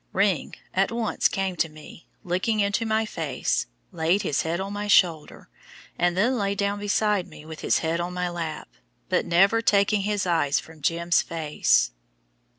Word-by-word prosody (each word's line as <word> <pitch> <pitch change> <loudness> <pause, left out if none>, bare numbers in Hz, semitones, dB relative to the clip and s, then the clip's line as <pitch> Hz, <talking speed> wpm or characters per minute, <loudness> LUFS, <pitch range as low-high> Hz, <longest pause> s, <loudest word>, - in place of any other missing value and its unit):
"Ring" 195 -5 +1 0.2
at 195 +3 +1
once 230 -2 +1
came 195 -1 -2
to 165 - +1
me, 155 +2 -14 0.2
looked 180 +3 -2
into 215 0 +1
my 220 0 +1
face, 165 -8 -2 0.2
laid 170 +5 +1
his 140 - 0
head 165 +2 -2
on 195 +1 -4
my 205 0 -4
shoulder, 170 -6 +2 0.5
and 175 0 +1
then 240 +5 +2
lay 200 0 0
down 200 0 -1
beside 205 -2 +1
me 150 - -13
with 160 0 -9
his - - +2
head 165 +1 0
on 175 +1 -3
my 180 0 -2
lap, 165 -3 -5 0.4
but 180 -1 +1
never 195 +6 +4
taking 200 -1 +3
his 205 0 -1
eyes 160 -5 +2
from 160 -1 -13
"Jim's" 170 +3 +2
face. 150 - +1
180 Hz, 170 wpm, -25 LUFS, 165-205 Hz, 0.5 s, never